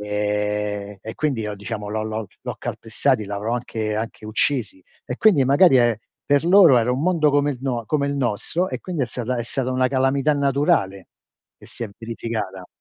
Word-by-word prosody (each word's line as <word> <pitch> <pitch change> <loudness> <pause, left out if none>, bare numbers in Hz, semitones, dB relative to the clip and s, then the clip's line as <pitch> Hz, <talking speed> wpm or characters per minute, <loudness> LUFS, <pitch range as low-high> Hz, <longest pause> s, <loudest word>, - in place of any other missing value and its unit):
Ehm, 105 0 -2
e 110 - -7
quindi 140 -7 -1
io 105 -1 -4
diciamo 105 0 -6
l'ho 110 +1 -2
l'ho 110 0 -4 0.2
l'ho - - -4
calpestati, 115 +1 -1
l'avrò 105 +3 -3
anche 110 -3 -3
anche 110 0 -5
uccisi 110 -3 -1 0.2
e 125 - -5
quindi 185 -9 +4
magari 140 +3 +5
è 120 -2 +3 0.3
per 145 +1 +2
loro 175 -6 +7
era 120 +2 +1
un 130 - -2
mondo 165 -4 +3
come 145 +1 +2
il 130 - -9
no 125 -4 -2
come 145 +1 0
il 140 - -1
nostro 135 - -1
e - - -5
quindi 175 -6 -3
è - - 0
stata 125 +2 -3
è 120 - -1
stata 130 +1 -2
una 130 0 +2
calamità 135 +2 +2
naturale 135 - +1 0.5
che - - -15
si 120 - -6
è - - -7
verificata. 110 -5 -5
120 Hz, 190 wpm, -22 LUFS, 105-140 Hz, 0.5 s, loro